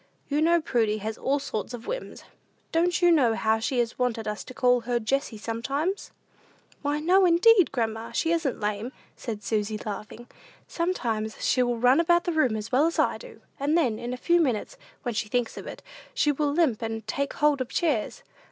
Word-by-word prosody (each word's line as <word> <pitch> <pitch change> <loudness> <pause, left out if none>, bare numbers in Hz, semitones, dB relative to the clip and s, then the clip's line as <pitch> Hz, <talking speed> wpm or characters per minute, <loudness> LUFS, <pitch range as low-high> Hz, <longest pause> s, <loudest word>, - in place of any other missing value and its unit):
You 295 +1 +1
know 340 +2 +4
Prudy 225 -8 0
has 215 +1 -4
all 275 +4 0
sorts 245 -4 -4
of 235 - -11
whims. - - -6 0.5
Don't 350 +2 +1
you 350 - +6
know 255 -9 +4
how 220 0 +1
she 255 +4 -2
has 240 0 -1
wanted 230 -3 -1
us 210 0 -3
to - - -10
call 250 -1 +3
her 240 +1 -1
Jessie 245 +1 -1
sometimes?" 275 - -3 0.7
"Why, 290 0 -1
no, 365 +5 +4
indeed, 365 +2 +5
grandma, 225 -3 -2
she 325 - 0
isn't 325 -6 0
lame," 210 +4 -3 0.2
said 215 -4 -6
Susy, 215 0 -1
laughing. 210 +3 -7 0.4
"Sometimes 230 -12 -2
she 255 - +3
will 245 -1 +1
run 250 +5 +4
about 345 +1 +3
the 350 - -1
room 255 -8 +2
as 215 +1 -5
well 275 +5 +4
as 335 - -3
I - - +1
do, - - -13 0.2
and 290 +4 +2
then, 245 -10 +1
in 240 - -5
a 250 - -4
few 345 +6 +3
minutes, 250 -9 -1 0.3
when 240 -3 -2
she 210 0 -2
thinks 245 0 -1
of - - -8
it, - - -9 0.3
she 300 -11 +3
will 290 0 0
limp 290 -8 +1
and 225 -1 -4
take 280 +6 -2
hold 295 -2 +2
of 255 - -3
chairs. 300 -11 -1
250 Hz, 200 wpm, -26 LUFS, 225-320 Hz, 0.7 s, you